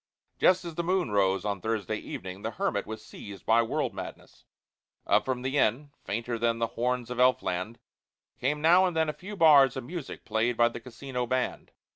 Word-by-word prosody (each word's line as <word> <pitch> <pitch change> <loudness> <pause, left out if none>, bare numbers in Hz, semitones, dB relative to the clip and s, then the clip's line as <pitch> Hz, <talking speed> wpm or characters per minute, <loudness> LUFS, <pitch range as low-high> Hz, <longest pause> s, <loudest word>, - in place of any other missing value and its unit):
Just 185 0 +4
as 170 - -5
the 170 - -2
moon 180 - 0
rose 95 -1 +2
on 100 -2 -2
Thursday 110 -1 -2
evening 95 -1 -7
the 110 - -2
hermit 100 -2 -2
was 110 0 -7
seized 100 -1 -10
by 115 +1 +4
the 115 - +3
world 125 -2 -1
madness. 95 - -9 0.6
Up - - +3
from 125 -1 -2
the 135 +2 0
inn, 135 +6 +1
fainter 115 +2 -3
than 115 0 +1
the 115 -1 -1
horns 125 0 -1
of 125 - -4
elf 130 0 +4
land, 90 +6 -3 0.6
came 150 +4 -1
now 180 +3 +6
and 175 -3 -3
then 160 -1 +2
a - - -2
few 205 +6 -9
bars 145 -7 +6
of 130 - -4
music 155 +2 -7
played 115 +2 0
by 120 0 +5
the 120 - -7
casino 125 +1 -5
band. 130 +1 -2
125 Hz, 205 wpm, -28 LUFS, 110-145 Hz, 0.6 s, now